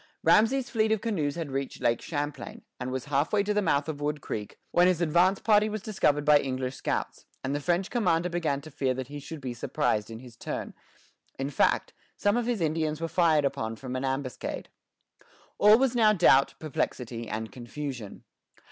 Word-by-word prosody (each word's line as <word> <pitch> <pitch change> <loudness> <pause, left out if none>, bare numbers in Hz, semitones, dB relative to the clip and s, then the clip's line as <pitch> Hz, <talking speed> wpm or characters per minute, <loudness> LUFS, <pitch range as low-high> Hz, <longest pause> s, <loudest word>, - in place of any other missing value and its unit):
Ramesay's 250 +4 +4
fleet 220 -2 +2
of 220 - +2
canoes 170 -11 -1
had 165 -5 -4
reached 135 0 -3
Lake 120 - +1
Champlain, 145 -2 -5 0.2
and 125 0 -3
was 130 -1 -3
halfway 150 +8 +1
to 210 +1 0
the 210 - +2
mouth 150 -6 +1
of 150 -2 -5
Wood 150 0 -1
Creek, 105 -6 -6
when 175 +1 +5
his 180 -3 +2
advance 175 +4 +3
party 210 0 +4
was 215 -2 -4
discovered 150 -9 +1
by 150 -1 +7
English 130 -1 -3
scouts, - - -3 0.2
and 135 - -2
the 145 - -1
French 175 +6 0
commander 180 -8 +2
began 165 -5 -1
to 155 +2 -12
fear 130 -2 0
that 130 0 -5
he 145 0 -6
should 155 +2 -8
be 130 -3 -5
surprised 115 -3 -1
in 115 - -7
his 120 -1 -13
turn; - - -5 0.6
in 135 +1 -3
fact, - - +1 0.2
some 205 +1 +2
of 240 -1 0
his 235 -6 -1
Indians 155 -1 0
were 165 - -2
fired 160 -4 +3
upon 125 -5 -2
from 130 +2 -6
an 130 - -2
ambuscade. 135 -1 -3 0.9
All 210 +2 +8
was 255 -1 +1
now 215 -3 +5
doubt, 150 -8 +4
perplexity, 120 -6 -3
and 110 0 -4
confusion. 120 -1 -7
150 Hz, 190 wpm, -28 LUFS, 130-185 Hz, 0.9 s, All